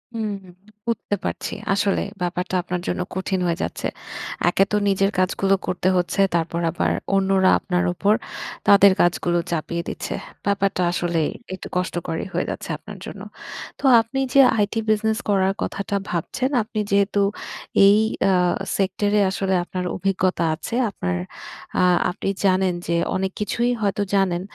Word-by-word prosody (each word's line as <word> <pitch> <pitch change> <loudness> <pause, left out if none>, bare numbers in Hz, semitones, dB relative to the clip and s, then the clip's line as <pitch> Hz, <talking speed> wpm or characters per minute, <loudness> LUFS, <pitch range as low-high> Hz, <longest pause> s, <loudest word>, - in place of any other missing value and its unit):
হুম, 220 -2 -2 0.6
বুঝতে 230 -3 -1
পারছি। - - -3 0.2
আসলেই, 200 0 0
ব্যাপারটা 180 +1 -2
আপনার 180 0 -3
জন্য - - -1
কঠিন 190 0 -1
হয়ে 170 -1 0
যাচ্ছে। - - -3 0.6
একে 190 - +3
তো 210 - +3
নিজের 195 0 +2
কাজগুলো 195 +1 +2
করতে 185 0 -1
হচ্ছে। 180 +2 +1
তারপর 170 0 0
আবার 175 - 0 0.2
অন্যরা 190 -1 +3
আপনার 180 0 0
উপর 200 +4 +2 0.5
তাদের 200 -1 +8
কাজগুলো 175 0 +2
চাপিয়ে 170 +1 -2
দিচ্ছে। - - -4 0.3
ব্যাপারটা 195 -2 +1
আসলেই 170 -3 0 0.2
একটু 185 - -7
কষ্টকরই 175 -1 -2
হয়ে - - 0
যাচ্ছে - - -5
আপনার - - -11
জন্য। - - -8 0.6
তো - - -15 0.2
আপনি 230 +4 -4
যে 275 - +8 0.2
IT 205 - -3 0.2
বিজনেস 220 +1 +2
করার 195 -1 +3
কথাটা 200 0 -3
ভাবছেন, 210 +9 -1
আপনি 215 0 -5
যেহেতু 200 0 +3 0.7
এই 200 +1 +6 0.3
আ - - +3 0.4
সেক্টরে 205 +2 +1
আসলে 190 0 -1
আপনার 180 0 -4
অভিজ্ঞতা 185 -2 0
আছে। 200 +8 -5
আপনার 90 - -2 0.6
আ - - +4 0.3
আপনি 190 - -3 0.2
জানেন 185 -1 +3
যে, 170 - +1 0.2
অনেক 190 0 -1
কিছুই 235 +4 0
হয়তো 205 0 0
জানেন 185 -3 +2
190 Hz, 145 wpm, -22 LUFS, 180-200 Hz, 0.7 s, তাদের